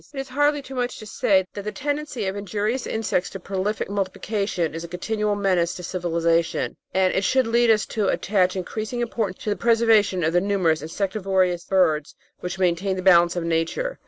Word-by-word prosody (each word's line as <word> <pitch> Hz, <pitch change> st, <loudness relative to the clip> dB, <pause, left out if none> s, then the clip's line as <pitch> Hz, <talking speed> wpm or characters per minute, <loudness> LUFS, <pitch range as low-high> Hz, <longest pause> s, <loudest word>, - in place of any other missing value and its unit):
It -, -, -4 dB
is 270 Hz, -, -5 dB
hardly 290 Hz, +1 st, +1 dB
too 270 Hz, -, -10 dB
much 245 Hz, -1 st, -2 dB
to 215 Hz, -, -9 dB
say 195 Hz, -3 st, +2 dB
that 205 Hz, -, -5 dB
the 210 Hz, +1 st, -4 dB
tendency 290 Hz, -4 st, -3 dB
of 190 Hz, +1 st, -2 dB
injurious 205 Hz, +5 st, -2 dB
insects 195 Hz, -5 st, -1 dB
to 195 Hz, -, -8 dB
prolific 195 Hz, +3 st, -2 dB
multiplication 195 Hz, -3 st, -2 dB
is 165 Hz, +1 st, -5 dB
a -, -, -6 dB
continual 210 Hz, +4 st, -1 dB
menace 185 Hz, -4 st, +1 dB
to 180 Hz, -, -8 dB
civilisation, 170 Hz, -2 st, 0 dB, 0.2 s
and 185 Hz, 0 st, +2 dB
this 190 Hz, -, 0 dB
should 260 Hz, +5 st, +3 dB
lead 235 Hz, +1 st, +3 dB
us 215 Hz, -2 st, +4 dB
to 215 Hz, -4 st, -1 dB
attach 185 Hz, -3 st, +1 dB
increasing 215 Hz, +6 st, -4 dB
importance 225 Hz, -5 st, -3 dB
to 210 Hz, -, -1 dB
the -, -, +1 dB
preservation 225 Hz, -5 st, +3 dB
of 160 Hz, +1 st, +1 dB
the 175 Hz, -, +4 dB
numerous 185 Hz, -6 st, +1 dB
in 155 Hz, -, -6 dB
sectivorous 190 Hz, -1 st, 0 dB
birds 160 Hz, -6 st, +1 dB, 0.2 s
which 180 Hz, +1 st, -5 dB
maintain 185 Hz, +1 st, +1 dB
the 185 Hz, -, -4 dB
balance 175 Hz, -2 st, +5 dB
of 175 Hz, -, -2 dB
Nature. 170 Hz, -, -1 dB
195 Hz, 195 wpm, -23 LUFS, 180-220 Hz, 0.2 s, balance